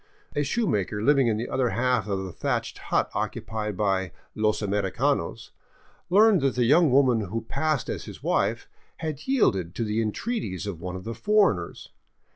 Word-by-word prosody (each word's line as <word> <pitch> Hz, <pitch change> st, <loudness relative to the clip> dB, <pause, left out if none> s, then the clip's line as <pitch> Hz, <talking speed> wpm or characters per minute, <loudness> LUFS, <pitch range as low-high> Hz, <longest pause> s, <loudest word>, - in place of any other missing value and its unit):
A 145 Hz, -, +1 dB
shoemaker 135 Hz, -, 0 dB
living 140 Hz, 0 st, +4 dB
in 110 Hz, -2 st, +1 dB
the 115 Hz, -, -3 dB
other 130 Hz, -2 st, 0 dB
half 125 Hz, -2 st, +1 dB
of 95 Hz, -2 st, -2 dB
the 95 Hz, -, -6 dB
thatched -, -, -2 dB
hut -, -, +1 dB
occupied 105 Hz, -3 st, -3 dB
by 95 Hz, -3 st, 0 dB
" -, -, -36 dB
los 110 Hz, 0 st, +2 dB
americanos 100 Hz, -1 st, -1 dB, 0.3 s
" -, -, -33 dB
learned 205 Hz, -1 st, +5 dB
that 135 Hz, -1 st, +1 dB
the 125 Hz, -, +2 dB
young 155 Hz, +5 st, +5 dB
woman 130 Hz, -3 st, +4 dB
who 115 Hz, +5 st, -3 dB
passed 155 Hz, +4 st, -1 dB
as -, -, -4 dB
his -, -, -10 dB
wife -, -, 0 dB, 0.3 s
had 155 Hz, -, -5 dB
yielded 95 Hz, -, +1 dB
to 115 Hz, -, -1 dB
the 110 Hz, +1 st, 0 dB
entreaties 110 Hz, -, -3 dB
of 95 Hz, -5 st, -5 dB
one 90 Hz, +1 st, -5 dB
of 90 Hz, -, -7 dB
the 115 Hz, -, -4 dB
foreigners. 120 Hz, -, +1 dB
115 Hz, 180 wpm, -26 LUFS, 100-145 Hz, 0.3 s, learned